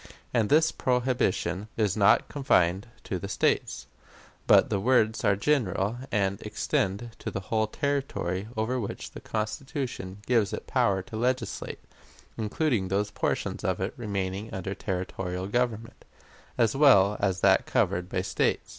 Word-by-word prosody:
And 115 -4 +2
this 160 +2 +4
prohibition 125 -7 0
is 105 -5 +1
not 105 0 +4
confined 95 - +2 0.2
to 95 - -3
the 100 - -5
States, 95 - 0 0.6
but - - +6
the 100 - +1
words 110 0 +2
are 100 -3 +4
general, 110 -3 0
and 100 -2 0
extend 100 +5 -1
to - - -4
the - - -4
whole 110 -1 +2
territory 120 - -2
over 120 +4 0
which 105 - -5
the - - -9
Constitution 110 -2 -4
gives 115 -5 +2
it - - -5
power 95 -1 +1
to 110 - -10
legislate, 125 +3 -2 0.5
including 110 -1 0
those 100 +2 -1
portions - - -2
of - - 0
it - - -2
remaining 100 -1 -3
under 95 +1 -4
territorial 90 -1 -4
government, 115 +1 -2 0.5
as 115 -1 +2
well 105 -9 +6
as 95 -2 0
that - - +4
covered 90 +1 0
by 90 -2 -1
States. - - 0
105 Hz, 145 wpm, -27 LUFS, 95-120 Hz, 0.6 s, but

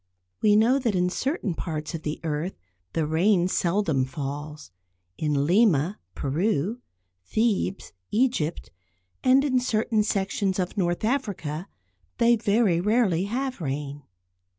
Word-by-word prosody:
We 210 -1 +5
know 235 +6 +4
that 235 -6 0
in 180 0 +1
certain 265 - -1
parts 155 -2 -4
of 165 - -4
the 150 -1 -4
earth 160 +3 -3 0.4
the 160 - 0
rain 175 +4 +3
seldom 170 -6 +1
falls. 145 - -6 0.5
In 145 -2 +1
Lima 185 -1 +3 0.2
(Peru), 185 - 0 0.4
Thebes 205 - -1 0.2
(Egypt), 215 -10 0 0.5
and 265 +2 +5
in 260 -3 +2
certain 225 -2 +1
sections 195 -1 0
of 180 -2 -2
North 175 0 0
Africa 200 - -2 0.5
they 235 0 +5
very 205 -5 +2
rarely 200 -4 +2
have 255 +1 -3
rain. 145 0 -4
190 Hz, 125 wpm, -25 LUFS, 155-220 Hz, 0.5 s, We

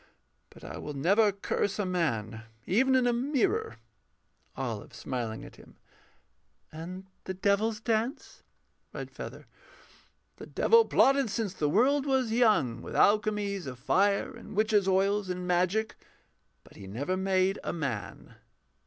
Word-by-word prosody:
But - - -17
I - - -7
will 150 - -6
never 200 +9 +3
curse 200 0 -2
a 205 - -1
man, 115 - -1 0.2
Even 260 +8 +3
in 255 -1 +3
a 245 - +3
mirror. 330 - 0 0.8
OLIVE - - -5
[smiling 115 -4 -4
at - - -14
him]. - - -17 1.0
And 180 +4 -8 0.2
the 190 - -4
Devil's 210 +3 +1
dance? 230 +4 -2 0.5
REDFEATHER. - - -8 0.9
The - - -10
Devil 460 0 +4
plotted 275 -2 +3
since 210 -3 -2
the 150 -6 -1
world 270 - +3
was 260 -4 +1
young 210 - +2
With - - -8
alchemies 205 -4 +2
of 130 -1 -6
fire 200 +10 +1
and 215 - -11
witches' 210 -2 +2
oils 195 +1 +1
And 180 0 -3
magic. 185 +5 +1 0.7
But - - -18
he 95 - -10
never 135 - -2
made 190 0 +1
a - - -2
man. 135 -11 -5
200 Hz, 135 wpm, -29 LUFS, 175-225 Hz, 1.0 s, Devil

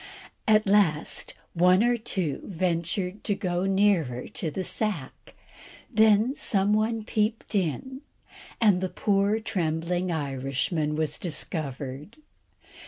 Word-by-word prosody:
At 215 0 +5
last 195 -7 +1 0.2
one 180 +4 +4
or 240 0 +3
two 190 -9 -2
ventured 180 +2 -2
to 205 - +1
go 180 -2 -1
nearer 190 -11 +2
to 165 - -3
the 185 +5 -4
sack, 195 -9 -3 0.6
then 220 +3 +4
some 205 -6 +1
one 220 +1 +1
peeped 215 +2 -1
in, 205 - -2 0.6
and 205 -5 +4
the 185 - -1
poor 200 +2 +1
trembling 175 -3 -1
Irishman 145 +1 -1
was 155 -1 -2
discovered. 150 - -4
185 Hz, 110 wpm, -26 LUFS, 160-210 Hz, 0.6 s, At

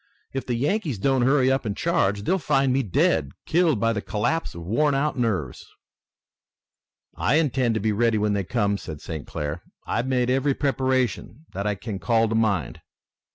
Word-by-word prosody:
If 135 - -4
the 120 - 0
Yankees 150 - -1
don't 130 +5 +1
hurry 130 +1 +3
up 135 - +1
and 105 -3 -3
charge, 105 - +1
they'll 190 - +1
find 135 -4 +2
me 135 - +2
dead, 80 - +1
killed 160 -7 +2
by 115 +1 +2
the 105 - -2
collapse 120 - -2
of 85 - -7
worn 140 - +2
out 145 +2 0
nerves." 105 - -2 1.5
"I 135 - +1
intend 130 -7 +1
to - - +1
be 110 +1 0
ready 115 +1 +2
when 105 0 +1
they 100 -1 0
come," 100 -1 0
said 80 -3 -8
St. 80 -1 -7
Clair. 75 +3 -4 0.2
"I've 115 +4 -1
made 125 -1 +1
every 135 +1 +1
preparation 130 +1 -1
that 100 +2 -3
I 105 - 0
can 100 0 -6
call 115 +5 +2
to - - -1
mind." 100 - 0
115 Hz, 185 wpm, -24 LUFS, 100-135 Hz, 1.5 s, hurry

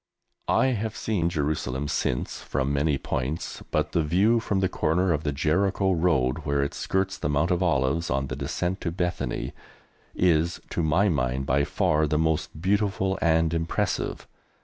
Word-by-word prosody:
I - - +3
have 110 -2 -2
seen 100 -8 0
Jerusalem 75 -4 -2
since 60 -3 -2
from 65 +1 -1
many 70 0 +1
points, 65 +5 -3
but 75 0 0
the 85 - +2
view 95 +10 +3
from 105 -3 -1
the 95 - +2
corner 90 +1 +1
of 75 0 -2
the 75 - 0
Jericho 95 +7 +1
Road, 80 -8 +2
where 70 -1 0
it 70 - -3
skirts 95 0 -1
the - - -1
Mount 75 +5 +1
of 90 0 +1
Olives 80 -1 +1
on 65 +1 0
the 65 - -5
descent 90 +7 -2
to 85 - -1
Bethany, 85 -7 -2 0.6
is, 85 -1 +2
to - - -1
my 80 +6 +3
mind, 65 -5 0
by 70 +2 +2
far 75 +1 +1
the 75 - +1
most 80 -1 0
beautiful 95 +1 0
and 80 -1 +3
impressive. 80 0 -2
80 Hz, 170 wpm, -26 LUFS, 70-90 Hz, 0.6 s, I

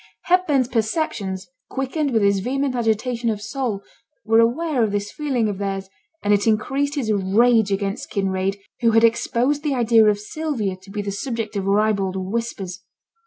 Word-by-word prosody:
Hepburn's 315 -8 +2
perceptions, 220 - -2 0.2
quickened 270 +3 -1
with 225 -5 +2
his 200 -1 +3
vehement 270 +5 -1
agitation 235 0 0
of 215 -2 -1
soul, 215 -2 -3 0.4
were 225 +1 +4
aware 255 +3 +2
of 215 - 0
this 205 0 -2
feeling 265 -7 -1
of 200 -2 -3
theirs; 195 -1 -3 0.3
and 205 - +3
it 205 +2 +2
increased 270 +7 +1
his 230 -7 0
rage 210 +2 +3
against 200 +3 -2
Kinraid, 195 -1 -1 0.2
who 230 -2 +3
had 225 0 +5
exposed 235 +5 +2
the 295 -3 0
idea 230 -2 +5
of 210 -1 +3
Sylvia 215 -3 -3
to 190 +1 -18
be 205 +1 -4
the 200 - -3
subject 220 +1 -4
of 195 -1 -2
ribald 200 -2 +2
whispers. 190 -1 -4
220 Hz, 165 wpm, -22 LUFS, 200-250 Hz, 0.4 s, had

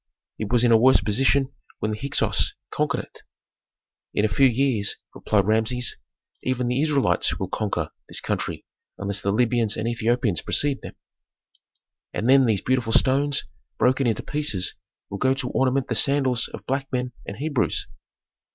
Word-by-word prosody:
"It 105 -1 -4
was 120 -1 +3
in 120 - +4
a 115 - +7
worse 130 +2 +6
position 135 +5 +1 0.2
when 110 - -2
the 105 - -3
Hyksos 140 0 +1 0.2
conquered - - 0
it." - - -17 0.9
"In 105 - +2
a - - +1
few 135 - +5
years," 120 -4 +1 0.2
replied 100 -3 +1
Rameses, 110 +3 0 0.5
"even 125 -1 -1
the 125 +3 +1
Israelites 150 -3 +2
will - - -4
conquer 100 -7 -2 0.2
this - - -2
country - - -3 0.3
unless 100 0 -3
the 100 - 0
Libyans 115 -1 +1
and 110 +1 -2
Ethiopians 115 -4 0
precede 145 -2 0
them. - - -9 1.2
And 110 - -1
then 135 -1 +6
these 105 -4 +1
beautiful 125 -3 0
stones, 140 +2 +2 0.3
broken 130 +1 +2
into 115 - -1
pieces, 145 -11 -1 0.4
will 100 - -5
go 130 0 +2
to 130 -2 -3
ornament 130 0 +1
the 125 - -1
sandals 130 0 +2
of - - -10
black 135 +1 -2
men 125 -1 -2 0.2
and 100 - -6
Hebrews." 145 -2 0
125 Hz, 160 wpm, -24 LUFS, 110-135 Hz, 1.2 s, a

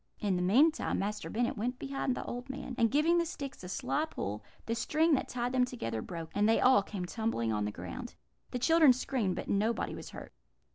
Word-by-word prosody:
"In 200 -3 +1
the 180 - 0
meantime, 275 - +3
Master 210 +2 -3
Bennet 240 +5 0
went 245 +4 -2
behind 275 -1 -2
the - - -4
old 245 +2 -6
man, 265 -1 -5
and 230 -2 +3
giving 315 +6 +3
the 340 - +1
sticks 280 - -7
a 180 - -7
sly 295 +10 -1
pull, 105 - -5 0.2
the 230 - -1
string 310 +7 +2
that 270 - +1
tied 245 0 -2
them 255 -1 +3
together 115 - -3
broke, 165 +2 -7
and 205 +1 +3
they 225 - +4
all 260 -4 +6
came 195 -2 -5
tumbling 175 - -1
on 105 -1 0
the 105 - -2
ground. 90 -3 -7 0.3
The - - -3
children 310 +1 +6
screamed, 245 -6 -1
but - - -5
nobody 215 +4 0
was - - -8
hurt. - - -10
240 Hz, 220 wpm, -32 LUFS, 190-270 Hz, 0.3 s, all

